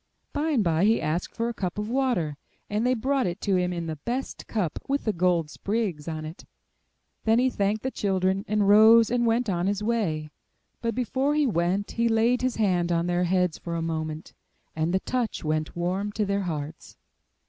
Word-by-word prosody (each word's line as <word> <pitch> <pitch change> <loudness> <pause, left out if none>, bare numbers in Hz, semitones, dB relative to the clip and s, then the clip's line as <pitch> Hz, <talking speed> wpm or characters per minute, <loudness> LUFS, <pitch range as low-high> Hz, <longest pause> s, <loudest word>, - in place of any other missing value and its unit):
By 305 +2 0
and 265 -9 +2
by 170 +1 +2
he 225 +2 +4
asked 165 +3 -2
for 230 0 -1
a 235 - -2
cup 185 -4 -4
of 210 0 -2
water, 240 - 0 0.4
and 215 +4 +1
they 255 - +3
brought 265 0 0
it 175 +3 -4
to 200 -2 +1
him 180 -1 +1
in 170 -1 -3
the 160 -1 -4
best 245 - -4
cup, 195 -8 -2
with 280 +1 0
the 215 - +1
gold 170 -3 +1
sprigs 200 -8 -2
on 155 -1 -4
it; 155 +3 -9 0.8
then 225 0 +3
he 255 +1 +3
thanked 205 +1 0
the 260 - -1
children, 190 -2 0
and 210 -1 +1
rose 220 +2 +7
and 240 -1 +2
went 230 +2 +1
on 180 -2 0
his 205 +1 -1
way; 170 -10 -1 0.5
but 230 -2 -1
before 265 +4 0
he 300 -1 +3
went 190 -2 0
he 235 0 +1
laid 230 +2 +2
his 255 -2 0
hand 180 -5 +1
on 170 0 +1
their 175 0 +1
heads 180 -2 +1
for 170 -1 -5
a 165 - -2
moment, 160 -1 -4 0.4
and 160 +2 0
the 190 +1 +1
touch 250 -3 -2
went 155 0 -1
warm 185 +4 -1
to 215 -1 0
their 200 0 0
hearts. 155 -4 -6
200 Hz, 205 wpm, -26 LUFS, 170-230 Hz, 0.8 s, rose